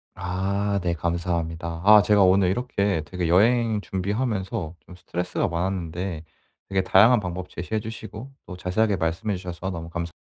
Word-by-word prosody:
아 100 Hz, +2 st, -1 dB
네 85 Hz, -1 st, +1 dB
감사합니다. 85 Hz, 0 st, -2 dB
아 105 Hz, 0 st, +9 dB
제가 105 Hz, -1 st, +4 dB
오늘 95 Hz, 0 st, +4 dB
이렇게 100 Hz, -5 st, 0 dB
되게 90 Hz, +1 st, -3 dB
여행 110 Hz, +5 st, +3 dB
준비하면서 95 Hz, -3 st, -2 dB
좀 90 Hz, -, -13 dB
스트레스가 90 Hz, 0 st, -2 dB
많았는데 85 Hz, -1 st, -3 dB, 0.5 s
되게 95 Hz, -1 st, +1 dB
다양한 110 Hz, +6 st, +6 dB
방법 90 Hz, -1 st, -5 dB
제시해 100 Hz, +5 st, -3 dB
주시고 110 Hz, +3 st, -8 dB
또 90 Hz, -, -8 dB
자세하게 100 Hz, +4 st, +1 dB
말씀해 85 Hz, +5 st, -1 dB
주셔서 90 Hz, 0 st, -5 dB
너무 85 Hz, -2 st, -6 dB
감사 85 Hz, 0 st, -4 dB
95 Hz, 365 characters per minute, -24 LUFS, 85-105 Hz, 0.5 s, 아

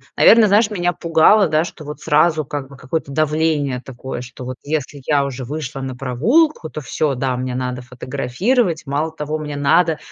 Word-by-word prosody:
наверно, 225 Hz, -1 st, +7 dB
знаешь, 210 Hz, +2 st, +4 dB
меня 175 Hz, -3 st, 0 dB
пугало, 170 Hz, +5 st, +4 dB
да, 155 Hz, +1 st, +2 dB
что 170 Hz, -2 st, -9 dB
вот 150 Hz, 0 st, -8 dB
сразу, 155 Hz, +1 st, +2 dB
как 140 Hz, -1 st, -5 dB
бы, 140 Hz, -, -13 dB
какое-то 140 Hz, +2 st, -4 dB
давление 150 Hz, -3 st, 0 dB
такое, 130 Hz, -1 st, -7 dB
что 125 Hz, 0 st, -9 dB
вот 130 Hz, 0 st, -5 dB
если 145 Hz, -1 st, -3 dB
я 145 Hz, -2 st, +3 dB
уже 135 Hz, -1 st, -5 dB
вышла 140 Hz, 0 st, -5 dB
на 130 Hz, -1 st, -5 dB
прогулку, 160 Hz, -, +1 dB
то -, -, -6 dB
всё, 140 Hz, +2 st, -1 dB
да, 130 Hz, 0 st, -1 dB
мне 125 Hz, 0 st, -3 dB
надо 125 Hz, 0 st, -3 dB
фотографировать, 140 Hz, -, -1 dB
мало 150 Hz, +3 st, -1 dB
того, 155 Hz, 0 st, -4 dB
мне 150 Hz, -1 st, -5 dB
надо, 155 Hz, +3 st, +3 dB
150 Hz, 185 wpm, -19 LUFS, 130-160 Hz, -, наверно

